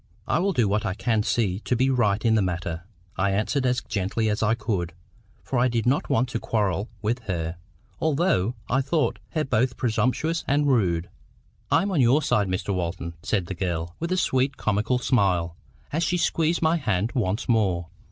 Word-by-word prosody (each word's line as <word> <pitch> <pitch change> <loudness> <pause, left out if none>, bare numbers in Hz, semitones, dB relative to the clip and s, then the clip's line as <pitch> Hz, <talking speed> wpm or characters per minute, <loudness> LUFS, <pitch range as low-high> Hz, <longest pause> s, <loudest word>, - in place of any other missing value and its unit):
"I - - +1
will 195 +3 +1
do 120 - +2
what 105 +2 +1
I 95 -4 -2
can 110 0 +1
see 105 -3 0
to 125 - -1
be 130 +3 +2
right 110 -4 +1
in 115 - +4
the 110 - +3
matter," 85 -2 -3 0.3
I 100 +3 +2
answered 130 +6 0
as 125 -1 0
gently 105 +3 -1
as 105 - -1
I 110 +1 +3
could; 100 -6 -2 0.5
for 130 - -1
I 125 - +4
did 115 -2 -1
not 130 +4 +1
want 125 +3 +2
to 115 - -2
quarrel 105 -2 -1
with 115 +4 0
her, 80 -3 -3 0.4
although 140 - +1
I 130 +2 +2
thought 145 +3 0
her 155 - +1
both 125 0 +1
presumptuous 130 +8 0
and 145 +2 +2
rude. 90 -10 +2 0.6
"I'm 200 +1 +2
on 165 -7 +2
your 130 +5 +4
side, 105 -6 +2
Mr 90 +1 -2
Walton," 85 -2 -3
said 95 -1 0
the 95 - -5
girl, 85 -2 -3
with 170 +2 -3
a 185 - +1
sweet 130 -5 +1
comical 110 +4 +1
smile, 95 -10 +1 0.4
as 160 - +1
she 175 +2 +1
squeezed 165 0 +1
my 160 +2 +3
hand 110 - 0
once 110 -3 -1
more. 95 -8 +1
110 Hz, 190 wpm, -25 LUFS, 95-130 Hz, 0.6 s, in